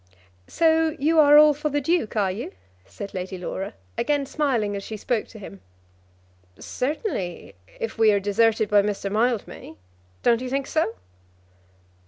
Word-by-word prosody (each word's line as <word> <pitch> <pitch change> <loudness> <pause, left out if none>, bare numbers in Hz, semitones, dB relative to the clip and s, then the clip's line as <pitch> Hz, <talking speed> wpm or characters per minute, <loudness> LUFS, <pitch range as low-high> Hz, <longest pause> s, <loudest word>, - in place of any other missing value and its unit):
"So 320 -1 +2
you 315 +2 +2
are 295 -1 +7
all 300 0 +7
for 300 +2 -3
the 290 0 0
Duke, 290 -6 -1
are 200 -3 +1
you?" 205 +6 -6 0.3
said 150 - -8
Lady 185 0 -5
Laura, 185 - -5 0.2
again 290 +2 0
smiling 255 -8 -1
as 200 - -4
she 215 - -7
spoke 230 +1 -2
to - - -13
him. 100 - -11 1.0
"Certainly; 255 - -4 0.3
if 225 0 -5
we 220 -1 +6
are 200 - +2
deserted 215 +2 +2
by 205 0 +4
Mr. 200 -1 -3
Mildmay. 225 - -2 0.5
Don't 235 0 +3
you 255 - -4
think 275 +1 -1
so?" 315 -8 -1
230 Hz, 155 wpm, -24 LUFS, 205-295 Hz, 1.0 s, are